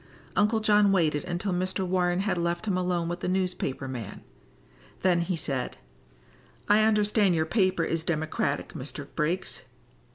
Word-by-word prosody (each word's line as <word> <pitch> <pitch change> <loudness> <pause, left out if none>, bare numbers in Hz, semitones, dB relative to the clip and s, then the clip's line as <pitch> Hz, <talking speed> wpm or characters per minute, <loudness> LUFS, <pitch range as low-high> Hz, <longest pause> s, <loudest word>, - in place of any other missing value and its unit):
Uncle 210 +2 +3
John 210 -2 +4
waited 155 -6 +2
until 180 +2 -2
Mr. 185 +1 -1
Warren 180 0 +1
had 195 0 0
left 170 +2 -1
him 200 -4 0
alone 180 -2 0
with 175 +1 -3
the - - -3
newspaper 180 -8 -1
man. 120 -5 -6 0.8
Then 180 -2 +3
he 175 +1 -1
said: 140 -5 -2 0.9
"I 210 +1 +5
understand 210 -3 +3
your 160 -1 +1
paper 185 -1 +2
is 165 -1 -1
Democratic, 155 -3 -1
Mr. 140 +2 -7
Briggs." 170 +4 -1
180 Hz, 150 wpm, -27 LUFS, 165-195 Hz, 0.9 s, I